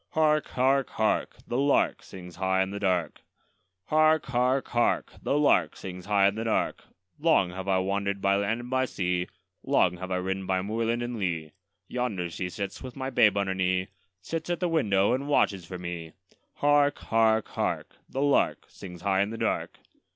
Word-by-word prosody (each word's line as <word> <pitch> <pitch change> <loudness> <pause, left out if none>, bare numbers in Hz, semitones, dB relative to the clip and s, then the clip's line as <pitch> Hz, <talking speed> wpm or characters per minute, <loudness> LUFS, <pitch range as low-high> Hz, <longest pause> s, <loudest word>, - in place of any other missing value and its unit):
Hark! 155 -2 +2
hark! 135 +1 +1
hark! 110 0 0
The 120 - -2
lark 140 +1 +2
sings 90 -2 -11
high 95 0 +2
in 95 - -5
the 100 - -5
dark. 90 -4 0 0.6
Hark! 155 0 +3
hark! 130 +1 +1
hark! 120 -1 +1
The 140 - 0
lark 150 -1 +3
sings 90 -1 -8
high 100 -2 +4
in 100 - +1
the 110 +2 -4
dark. 115 - -1 0.4
Long 145 - +3
have 95 +1 -7
I 95 -1 +3
wander'd 100 +1 -1
by 100 0 +2
land 100 +4 0
and 120 - -9
by 130 0 +2
sea, 90 -5 -1 0.3
Long 90 -1 +2
have 95 +1 -6
I 95 - 0
ridden 95 +1 -2
by 95 -1 0
moorland 115 +3 -1
and 120 -1 -4
lea; 85 -5 -2 0.4
Yonder 105 -9 -2
she 90 +2 -4
sits 100 +3 -5
with 130 -2 -8
my 130 0 -4
babe 110 -5 +4
on 100 - +1
her 95 - -1
knee, 95 0 0 0.3
Sits 165 - -4
at 175 - -1
the 180 - 0
window 105 - +2
and 135 +3 -2
watches 100 - +2
for 90 - -6
me! 85 -2 -6 0.4
Hark! 145 0 +3
hark! 110 -1 +2
hark! - - -3
The 135 - -2
lark 145 -1 +2
sings 90 -3 -10
high 95 -1 +2
in 100 - 0
the 115 - -6
dark. - - -2
100 Hz, 190 wpm, -27 LUFS, 95-130 Hz, 0.6 s, high